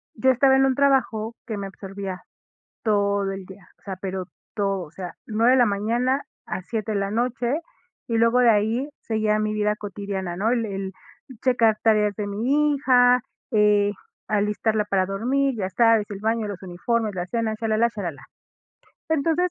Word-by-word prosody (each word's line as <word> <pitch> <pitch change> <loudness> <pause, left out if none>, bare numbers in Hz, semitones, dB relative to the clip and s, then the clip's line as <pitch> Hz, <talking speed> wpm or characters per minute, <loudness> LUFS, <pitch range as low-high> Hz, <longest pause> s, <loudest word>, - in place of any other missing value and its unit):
yo 260 +4 +4
estaba 265 +1 +4
en 270 - +4
un 265 -1 +2
trabajo 240 -5 +1
que 220 -3 -4
me 200 - -4
absorbía 195 -1 -7 0.6
todo 200 -2 +1
el 195 0 -7
día. 190 -1 -14
O - - -33
sea, 190 -2 -6
pero 190 0 -4 0.3
todo. 195 -2 0
O 160 - -10
sea, 180 +1 -7
9 225 +3 +3
de 260 - +5
la 245 - +5
mañana 235 +7 0 0.2
a - - -4
7 215 +2 -3
de 205 - 0
la 200 0 -1
noche, 240 +5 0 0.5
y 230 -1 0
luego 230 +2 +4
de 240 -2 +6
ahí 225 +6 +1
seguía 215 -1 0
mi 215 0 0
vida 210 0 +1
cotidiana, 200 -3 -5
¿no? 210 +5 +1
El 235 -2 +1
el 195 -1 -4 0.5
checar 230 -4 +3
tareas 210 -2 +3
de 205 +1 -4
mi 280 +9 +1
hija, 250 -2 +4 0.3
eh, 210 -2 +4 0.4
alistarla 210 +1 +1
para 195 -2 +1
dormir, 255 +6 0
ya 190 -3 -2
sabes, 225 +1 +4
el 200 -1 -6
baño, 225 0 0
los 200 -3 -6
uniformes, 210 +4 -1
la 175 0 -2
cena, 220 +1 -1
chalalá, 225 +1 +1
chalalá. 180 -9 -5 0.9
Entonces, 320 +3 +1
215 Hz, 175 wpm, -24 LUFS, 200-240 Hz, 0.9 s, de